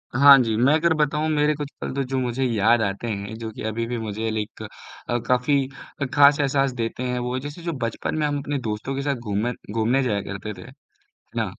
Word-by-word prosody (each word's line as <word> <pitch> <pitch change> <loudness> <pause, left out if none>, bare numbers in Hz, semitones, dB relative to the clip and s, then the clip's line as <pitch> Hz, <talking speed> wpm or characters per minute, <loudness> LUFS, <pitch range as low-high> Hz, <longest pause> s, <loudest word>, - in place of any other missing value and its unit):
हाँ 140 +1 +9
जी, 110 -2 -1
मैं 130 +6 +4
अगर 165 +1 +3
बताऊँ 150 0 +1
मेरे 150 0 +2
कुछ 145 -1 -5
पल - - -3
तो 140 - 0
जो 130 +1 -3
मुझे 125 +1 -1
याद 115 -1 +3
आते 100 +2 -2
हैं, 100 0 -4
जो 110 -1 -5
कि - - -10
अभी 110 +1 -2
भी 120 0 -3
मुझे 110 0 -3
लाइक 110 0 -4 0.5
अ, 120 - +2
काफ़ी 130 +2 +2 0.3
अ, - - +2
खास 145 0 +6
एहसास 135 -1 +2
देते 115 +2 -2
हैं 125 0 -1
वो 125 +1 -2
जैसे 145 +5 -8
जो 170 - -2
बचपन 115 +5 -2
में 150 - +1
हम 145 -1 -1
अपने 145 +1 -3
दोस्तों 110 +4 -3
के 140 - -2
साथ 140 0 0
घूमन 115 0 -2 0.2
घूमने 115 +4 +2
जाया 105 -5 0
करते 100 +2 -6
थे। - - -12
है 135 - -12 0.7
ना? - - +1
125 Hz, 230 wpm, -23 LUFS, 110-140 Hz, 0.7 s, हाँ